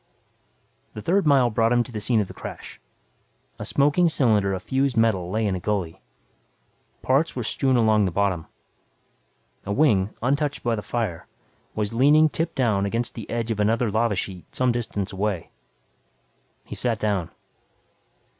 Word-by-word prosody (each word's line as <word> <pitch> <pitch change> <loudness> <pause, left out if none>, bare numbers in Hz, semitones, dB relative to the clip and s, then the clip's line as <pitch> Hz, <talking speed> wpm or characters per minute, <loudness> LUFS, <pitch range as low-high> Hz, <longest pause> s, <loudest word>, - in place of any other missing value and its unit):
The 105 - -6
third 190 0 +2
mile 130 -4 +4
brought 115 +1 +2
him 120 0 +3
to 125 - -12
the 110 - -4
scene 110 0 +2
of 100 - -3
the - - -10
crash. - - -9 0.8
A - - -5
smoking 145 +5 +3
cylinder 110 -10 +2
of 95 -1 -4
fused 135 +1 0
metal 105 -6 +2
lay 110 +3 0
in 100 - 0
a 95 - -2
gully. 95 -4 -3 1.0
Parts 140 +5 +1
were 125 - -3
strewn 130 +3 +1
along 110 -3 +3
the 90 - -1
bottom. 95 -3 -1 1.2
A 100 - -5
wing, 105 -7 +3
untouched 140 +2 0
by 120 - +1
the 110 - -2
fire, 105 -8 -3 0.5
was 105 0 -2
leaning 150 +6 +5
tip 165 +3 -3
down 105 -6 +1
against 115 +3 -2
the 115 -4 -8
edge 115 -1 -2
of 110 - -3
another 110 +2 +1
lava 110 0 +1
sheet 90 -1 -5
some 130 -1 +2
distance 110 -4 -3
away. 95 -3 -2 1.1
He - - -10
sat 115 -3 -1
down. 100 -6 -1
115 Hz, 165 wpm, -24 LUFS, 100-130 Hz, 1.2 s, leaning